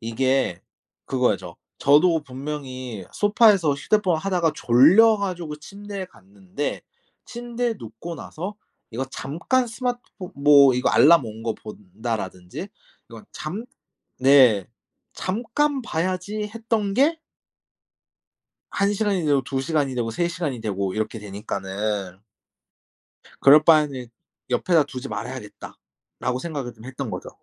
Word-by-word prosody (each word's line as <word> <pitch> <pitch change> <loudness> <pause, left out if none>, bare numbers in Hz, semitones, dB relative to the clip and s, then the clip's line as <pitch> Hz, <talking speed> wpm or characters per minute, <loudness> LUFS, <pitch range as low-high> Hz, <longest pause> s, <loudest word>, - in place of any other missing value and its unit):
이게 115 -4 0 0.4
그거 125 -3 +1
알죠? 90 -4 -7 0.2
저도 155 +3 +4
분명히 130 -5 -6
소파에서 205 -6 +4
휴대폰 185 +3 +1
하다가 175 -2 0
졸려 170 - +6
가지고 175 -6 -4
침대에 200 +4 -8
갔는데 100 - -6 0.4
침대에 240 -1 -3
눕고 115 +10 -8
나서 180 +5 -7 0.4
이거 125 +4 -3
잠깐 170 - -1
스마트폰 245 -5 -5
뭐 140 -2 +6
이거 125 - +1
'알람 160 -3 +6
온 110 0 -8
거 115 -1 -2
본다.'라든지 105 - -6 0.4
이거 115 -2 -12
잠 190 +9 -5 0.5
네, 130 -7 +5 0.5
'잠깐 250 +8 -1
봐야지.' 185 +3 -3
했던 225 -3 -1
게 300 +7 +3 1.5
1 200 +1 +1
시간이 200 -5 0
되고 145 -2 +3
2 135 0 -3
시간이 140 -2 -1
되고 115 -2 -2
3 170 +9 0
시간이 150 -9 -4
되고 100 -3 -2
이렇게 110 +1 -3
되니까는 100 -1 -4 1.2
그럴 150 +3 +7
바에는 150 -6 +3 0.4
'옆에다 165 +4 +3
두지 135 -1 -7
말아야겠다.'라고 125 0 -7
생각을 140 -6 -5
좀 110 +1 -15
했던 130 0 -5
거죠. - - -6
145 Hz, 260 characters per minute, -23 LUFS, 115-195 Hz, 1.5 s, 그럴